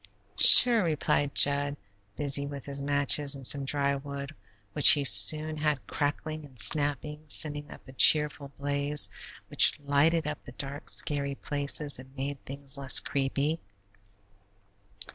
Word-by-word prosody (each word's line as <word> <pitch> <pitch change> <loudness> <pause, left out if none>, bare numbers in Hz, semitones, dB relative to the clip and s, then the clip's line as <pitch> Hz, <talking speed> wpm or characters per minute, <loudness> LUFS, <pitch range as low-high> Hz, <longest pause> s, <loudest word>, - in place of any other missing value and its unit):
"Sure," 235 -4 +7
replied 150 -3 -3
Jud, 145 0 +2 0.4
busy 140 -1 +1
with 140 -2 -10
his 140 0 -6
matches 145 0 +1
and 135 -1 -4
some 140 +2 +2
dry 140 0 -2
wood, 140 +1 -9 0.4
which 150 - +5
he 145 - +4
soon 145 +9 +3
had 150 -3 -4
crackling 155 +2 -6
and 135 -3 -18
snapping, 150 +4 -3
sending 145 0 -1
up - - -16
a 130 - -14
cheerful 150 0 +3
blaze 145 +1 +1 0.4
which - - +2
lighted 145 +3 -1
up 150 -1 -7
the 125 - -14
dark, 140 +2 -6
scary 140 -1 0
places 145 0 -2
and 130 +1 -16
made 140 +1 -7
things 140 0 -8
less 135 -1 +4
creepy. 140 +3 -4
145 Hz, 140 wpm, -26 LUFS, 140-150 Hz, 0.4 s, Sure